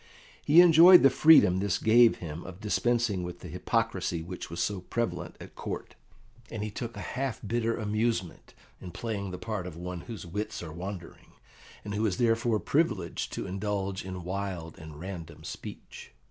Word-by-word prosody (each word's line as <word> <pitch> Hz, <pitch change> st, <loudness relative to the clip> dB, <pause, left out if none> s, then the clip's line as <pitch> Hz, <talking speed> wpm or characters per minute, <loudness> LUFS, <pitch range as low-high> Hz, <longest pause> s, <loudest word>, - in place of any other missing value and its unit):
He 160 Hz, +4 st, +7 dB
enjoyed 175 Hz, +1 st, +8 dB
the 135 Hz, -, +7 dB
freedom 130 Hz, -, +6 dB
this 100 Hz, -1 st, 0 dB
gave 115 Hz, +1 st, +5 dB
him 85 Hz, 0 st, -7 dB
of 90 Hz, +1 st, -10 dB
dispensing 115 Hz, -1 st, 0 dB
with 90 Hz, 0 st, -7 dB
the -, -, -8 dB
hypocrisy 85 Hz, -2 st, -1 dB
which 90 Hz, +2 st, -7 dB
was 85 Hz, +1 st, -6 dB
so 100 Hz, +2 st, -1 dB
prevalent 90 Hz, -4 st, -3 dB
at -, -, -11 dB
Court, -, -, -6 dB, 0.6 s
and 110 Hz, -2 st, -5 dB
he 105 Hz, -, -4 dB
took 115 Hz, +1 st, -6 dB
a -, -, -5 dB
half 130 Hz, -3 st, -2 dB
bitter 115 Hz, +2 st, 0 dB
amusement 110 Hz, -4 st, -2 dB, 0.3 s
in 90 Hz, -, -7 dB
playing 100 Hz, +1 st, -4 dB
the 90 Hz, -, -6 dB
part 105 Hz, -4 st, -4 dB
of 85 Hz, -3 st, -9 dB
one 90 Hz, 0 st, -6 dB
whose 110 Hz, -2 st, -8 dB
wits 105 Hz, +2 st, -4 dB
are 80 Hz, -2 st, -8 dB
wandering, 90 Hz, 0 st, -8 dB, 0.5 s
and 105 Hz, -, -4 dB
who 105 Hz, +2 st, -1 dB
is 90 Hz, -3 st, -2 dB
therefore 115 Hz, -1 st, +2 dB
privileged 115 Hz, -, -1 dB
to -, -, -4 dB
indulge 100 Hz, 0 st, -3 dB
in 95 Hz, -1 st, -7 dB
wild 90 Hz, -3 st, -4 dB
and 80 Hz, -3 st, -10 dB
random 85 Hz, -3 st, -8 dB
speech. -, -, -9 dB
100 Hz, 175 wpm, -29 LUFS, 90-115 Hz, 0.6 s, enjoyed